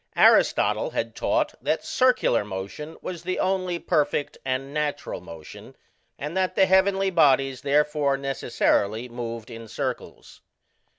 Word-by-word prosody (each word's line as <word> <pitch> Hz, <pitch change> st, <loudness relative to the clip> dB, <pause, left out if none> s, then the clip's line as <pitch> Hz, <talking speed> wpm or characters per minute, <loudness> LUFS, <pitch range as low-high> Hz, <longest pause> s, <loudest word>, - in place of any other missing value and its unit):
Aristotle -, -, +4 dB
had -, -, -3 dB
taught -, -, 0 dB
that -, -, -1 dB
circular 255 Hz, -, +2 dB
motion 100 Hz, -, -7 dB
was 175 Hz, -3 st, -5 dB
the 185 Hz, +1 st, -3 dB
only 185 Hz, -2 st, 0 dB
perfect 150 Hz, -4 st, 0 dB
and 130 Hz, +2 st, -3 dB
natural 150 Hz, -8 st, -3 dB
motion, 85 Hz, -3 st, -12 dB, 0.4 s
and 150 Hz, +4 st, -5 dB
that 190 Hz, -1 st, 0 dB
the 190 Hz, -, +5 dB
heavenly 190 Hz, +1 st, +3 dB
bodies 135 Hz, -5 st, +3 dB
therefore 145 Hz, 0 st, +1 dB
necessarily 120 Hz, -4 st, 0 dB
moved 115 Hz, -1 st, -6 dB
in 115 Hz, 0 st, -9 dB
circles. -, -, -6 dB
145 Hz, 125 wpm, -25 LUFS, 120-180 Hz, 0.4 s, the